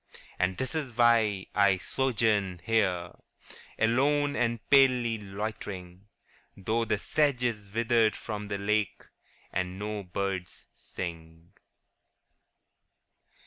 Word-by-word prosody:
' -, -, -24 dB
And 90 Hz, 0 st, +1 dB
this 130 Hz, +7 st, -3 dB
is 140 Hz, -7 st, -4 dB
why 115 Hz, -5 st, +4 dB
I 100 Hz, -2 st, +4 dB
sojourn 105 Hz, -3 st, 0 dB
here 95 Hz, -6 st, +1 dB, 0.7 s
Alone 140 Hz, +6 st, +2 dB
and 115 Hz, -4 st, -1 dB
palely 125 Hz, -5 st, +5 dB
loitering, 100 Hz, -2 st, -6 dB, 0.5 s
Though 110 Hz, +4 st, 0 dB
the 105 Hz, -1 st, 0 dB
sedge 140 Hz, +2 st, +1 dB
is 105 Hz, -5 st, -2 dB
withered 115 Hz, 0 st, +2 dB
from 105 Hz, -2 st, -5 dB
the 100 Hz, -1 st, -2 dB
lake, 105 Hz, -1 st, -1 dB, 0.5 s
And 90 Hz, 0 st, -2 dB
no 105 Hz, +1 st, -4 dB
birds 95 Hz, -1 st, -4 dB
sing.' 80 Hz, -1 st, -8 dB
105 Hz, 105 wpm, -29 LUFS, 95-120 Hz, 0.7 s, palely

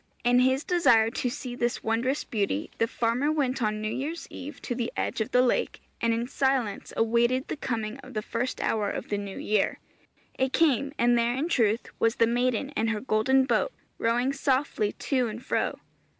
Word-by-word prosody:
In 245 Hz, +1 st, +4 dB
his 260 Hz, +3 st, +3 dB
desire 230 Hz, -11 st, +4 dB
to 250 Hz, -, -1 dB
see 245 Hz, +1 st, -6 dB
this 240 Hz, -1 st, -1 dB
wondrous 235 Hz, +5 st, 0 dB
beauty, 200 Hz, -, -2 dB
the 230 Hz, -, +3 dB
farmer 240 Hz, +6 st, 0 dB
went 270 Hz, -4 st, 0 dB
on 215 Hz, -1 st, 0 dB
New 215 Hz, -, -1 dB
Year's 315 Hz, +6 st, -4 dB
Eve 290 Hz, +3 st, -8 dB
to 245 Hz, -, -2 dB
the 240 Hz, -1 st, -2 dB
edge -, -, -1 dB
of 220 Hz, -, -1 dB
the 250 Hz, -, +4 dB
lake, 250 Hz, -, 0 dB, 0.2 s
and 230 Hz, -, +2 dB
in 230 Hz, +1 st, 0 dB
silence 260 Hz, -6 st, 0 dB
awaited 235 Hz, +3 st, +2 dB
the -, -, -3 dB
coming 230 Hz, -3 st, -3 dB
of 260 Hz, -2 st, -12 dB
the 215 Hz, -, -1 dB
first 240 Hz, +4 st, -3 dB
hour 210 Hz, -2 st, 0 dB
of -, -, -5 dB
the 205 Hz, -, -1 dB
new 200 Hz, -1 st, -6 dB
year. 210 Hz, -1 st, +1 dB, 0.6 s
It 265 Hz, 0 st, +1 dB
came, 280 Hz, -3 st, +3 dB
and 240 Hz, 0 st, +4 dB
there 235 Hz, +1 st, +1 dB
in 300 Hz, +6 st, -1 dB
truth 230 Hz, -6 st, +2 dB
was 230 Hz, 0 st, +2 dB
the 230 Hz, -, +4 dB
maiden 245 Hz, +2 st, 0 dB
in 225 Hz, -5 st, 0 dB
her 220 Hz, -2 st, 0 dB
golden 260 Hz, +3 st, +2 dB
boat, 245 Hz, -, +1 dB, 0.3 s
rowing 240 Hz, +4 st, +1 dB
softly 265 Hz, -6 st, 0 dB
to 255 Hz, -4 st, 0 dB
and 225 Hz, +3 st, -7 dB
fro. -, -, 0 dB
240 Hz, 195 wpm, -27 LUFS, 225-265 Hz, 0.6 s, In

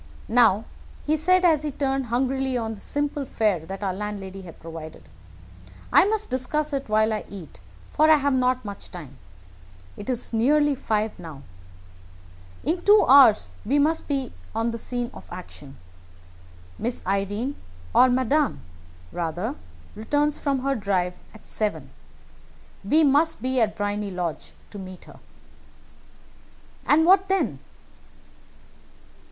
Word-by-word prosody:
Now," 225 Hz, -2 st, +4 dB, 0.4 s
he 305 Hz, -, +2 dB
said, 365 Hz, +4 st, +3 dB
as 315 Hz, -4 st, +4 dB
he 305 Hz, -, -2 dB
turned 270 Hz, -2 st, -1 dB
hungrily 260 Hz, +2 st, 0 dB
on 225 Hz, -2 st, -3 dB
the 205 Hz, -, -12 dB
simple 290 Hz, 0 st, -2 dB
fare 210 Hz, -, 0 dB
that 195 Hz, +2 st, -6 dB
our 190 Hz, -2 st, -1 dB
landlady 195 Hz, -1 st, -6 dB
had 175 Hz, -3 st, -12 dB
provided, 160 Hz, -, -10 dB, 0.9 s
"I -, -, +7 dB
must 430 Hz, +1 st, -1 dB
discuss 290 Hz, +4 st, -1 dB
it 275 Hz, -4 st, -3 dB
while 215 Hz, +1 st, +3 dB
I 215 Hz, -, -3 dB
eat, 185 Hz, -, -10 dB, 0.3 s
for 310 Hz, +1 st, +3 dB
I 315 Hz, -, +8 dB
have 285 Hz, -1 st, +1 dB
not 255 Hz, -1 st, +1 dB
much 200 Hz, -1 st, -8 dB
time. 145 Hz, -7 st, -10 dB, 0.8 s
It 205 Hz, -, -8 dB
is 245 Hz, -1 st, -3 dB
nearly 290 Hz, +6 st, +3 dB
five 220 Hz, -5 st, -2 dB
now. 160 Hz, -5 st, -10 dB, 1.2 s
In 345 Hz, +3 st, -1 dB
two 415 Hz, +1 st, +6 dB
hours 225 Hz, -, +6 dB
we 270 Hz, +7 st, +1 dB
must 310 Hz, +3 st, +1 dB
be 275 Hz, -2 st, -2 dB, 0.2 s
on 230 Hz, +1 st, 0 dB
the 230 Hz, -, -5 dB
scene 245 Hz, +1 st, -4 dB
of -, -, -12 dB
action. 145 Hz, -6 st, -10 dB, 1.0 s
Miss 240 Hz, +2 st, -3 dB
Irene, 205 Hz, +8 st, -1 dB, 0.4 s
or 255 Hz, -, +6 dB
Madame, 260 Hz, +2 st, +1 dB, 0.5 s
rather, 170 Hz, 0 st, -3 dB, 0.4 s
returns 290 Hz, +7 st, 0 dB
from 275 Hz, -3 st, -1 dB
her 275 Hz, 0 st, +1 dB
drive 195 Hz, -6 st, -1 dB, 0.2 s
at 220 Hz, -, -15 dB
seven. 160 Hz, -11 st, -3 dB, 0.9 s
We 305 Hz, +11 st, +3 dB
must 300 Hz, +3 st, +3 dB
be 255 Hz, -1 st, 0 dB
at 215 Hz, -2 st, +1 dB
Briony 205 Hz, 0 st, -2 dB
Lodge 180 Hz, -4 st, -4 dB, 0.2 s
to 205 Hz, -, -8 dB
meet 185 Hz, -1 st, -10 dB
her." -, -, -15 dB, 1.7 s
"And 320 Hz, +2 st, +5 dB
what 380 Hz, +2 st, +5 dB
then?" 385 Hz, 0 st, 0 dB
240 Hz, 140 wpm, -24 LUFS, 200-285 Hz, 1.7 s, I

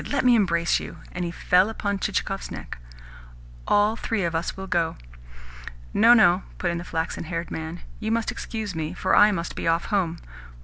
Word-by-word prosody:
Let 280 Hz, -3 st, +1 dB
me 250 Hz, -, +6 dB
embrace 170 Hz, -7 st, +2 dB
you!" -, -, -8 dB
And 180 Hz, -, -4 dB
he 170 Hz, -, -2 dB
fell 180 Hz, +3 st, +3 dB
upon 200 Hz, -3 st, -2 dB
Chichikov's 195 Hz, -1 st, -2 dB
neck. -, -, -8 dB, 0.9 s
"All 205 Hz, +2 st, +3 dB
three 225 Hz, -3 st, -2 dB
of 170 Hz, -1 st, -1 dB
us 165 Hz, +3 st, -2 dB
will 190 Hz, -, -5 dB
go." 170 Hz, -3 st, 0 dB, 1.0 s
"No, 230 Hz, +3 st, +7 dB
no," 190 Hz, -5 st, +5 dB, 0.2 s
put 175 Hz, -, -1 dB
in 170 Hz, -, -3 dB
the -, -, -6 dB
flaxen 165 Hz, -1 st, -3 dB
haired 170 Hz, +1 st, -4 dB
man. 160 Hz, +1 st, -5 dB, 0.2 s
"You 220 Hz, 0 st, -2 dB
must 230 Hz, 0 st, 0 dB
excuse 220 Hz, -4 st, -5 dB
me, 160 Hz, +1 st, -4 dB
for 185 Hz, -, +1 dB
I 210 Hz, +1 st, +7 dB
must 170 Hz, -3 st, -3 dB
be -, -, -3 dB
off 165 Hz, +1 st, +2 dB
home." 175 Hz, -4 st, +1 dB
180 Hz, 190 wpm, -25 LUFS, 170-210 Hz, 1.0 s, No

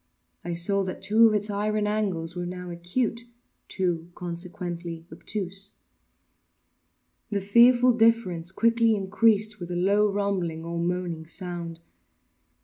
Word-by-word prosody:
I 175 Hz, 0 st, -3 dB
saw 195 Hz, +4 st, +3 dB
that 185 Hz, -, -6 dB
two 225 Hz, +2 st, +5 dB
of 215 Hz, -, +2 dB
its 210 Hz, 0 st, -1 dB
iron 210 Hz, +1 st, 0 dB
angles 190 Hz, -6 st, -1 dB
were 175 Hz, 0 st, -3 dB
now 180 Hz, 0 st, -6 dB
acute—two, 185 Hz, -3 st, -3 dB
consequently, 175 Hz, -1 st, -6 dB
obtuse. 195 Hz, -1 st, -4 dB, 1.6 s
The 205 Hz, -, -1 dB
fearful 240 Hz, +5 st, +5 dB
difference 225 Hz, -7 st, +2 dB
quickly 230 Hz, +2 st, +3 dB
increased 210 Hz, +1 st, +2 dB
with 175 Hz, -1 st, -7 dB
a 175 Hz, -, -3 dB
low 200 Hz, +3 st, +3 dB
rumbling 185 Hz, -5 st, -2 dB
or 170 Hz, 0 st, -4 dB
moaning 170 Hz, -2 st, -2 dB
sound. 170 Hz, -2 st, -5 dB
190 Hz, 120 wpm, -26 LUFS, 175-215 Hz, 1.6 s, two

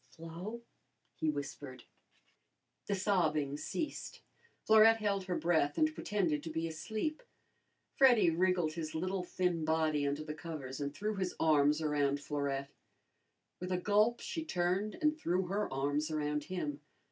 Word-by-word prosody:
"Flo," 170 Hz, -, -8 dB, 0.5 s
he 160 Hz, -, -1 dB
whispered. 140 Hz, -3 st, -5 dB, 1.0 s
The 200 Hz, -, +1 dB
sobbing 160 Hz, -8 st, +1 dB
ceased. 300 Hz, -, -4 dB, 0.4 s
Florette 220 Hz, +1 st, +7 dB
held 200 Hz, -3 st, -1 dB
her 180 Hz, -1 st, -1 dB
breath 160 Hz, -3 st, +1 dB
and 310 Hz, 0 st, +3 dB
pretended 175 Hz, -, 0 dB
to 160 Hz, -, -6 dB
be 160 Hz, +1 st, -2 dB
asleep. 220 Hz, -, -3 dB, 0.8 s
Freddy 245 Hz, -10 st, +6 dB
wriggled 175 Hz, -2 st, +1 dB
his 155 Hz, -1 st, -5 dB
little 185 Hz, +3 st, -1 dB
thin 180 Hz, -2 st, -1 dB
body 155 Hz, -2 st, +1 dB
under 145 Hz, +2 st, -2 dB
the 150 Hz, 0 st, -5 dB
covers 150 Hz, -4 st, -6 dB
and 140 Hz, 0 st, -2 dB
threw 210 Hz, +8 st, -3 dB
his 185 Hz, -2 st, -2 dB
arms 150 Hz, -1 st, +3 dB
around 145 Hz, -2 st, +1 dB
Florette. 140 Hz, -1 st, -3 dB, 0.9 s
With 180 Hz, +1 st, -5 dB
a 180 Hz, -, +2 dB
gulp, 210 Hz, +5 st, +2 dB
she 325 Hz, -, -4 dB
turned 190 Hz, -, 0 dB
and 305 Hz, 0 st, +4 dB
threw 185 Hz, -, 0 dB
her 200 Hz, +4 st, -2 dB
arms 145 Hz, +3 st, 0 dB
around 150 Hz, -1 st, -1 dB
him. 150 Hz, -6 st, -4 dB
165 Hz, 145 wpm, -33 LUFS, 150-195 Hz, 1.0 s, Florette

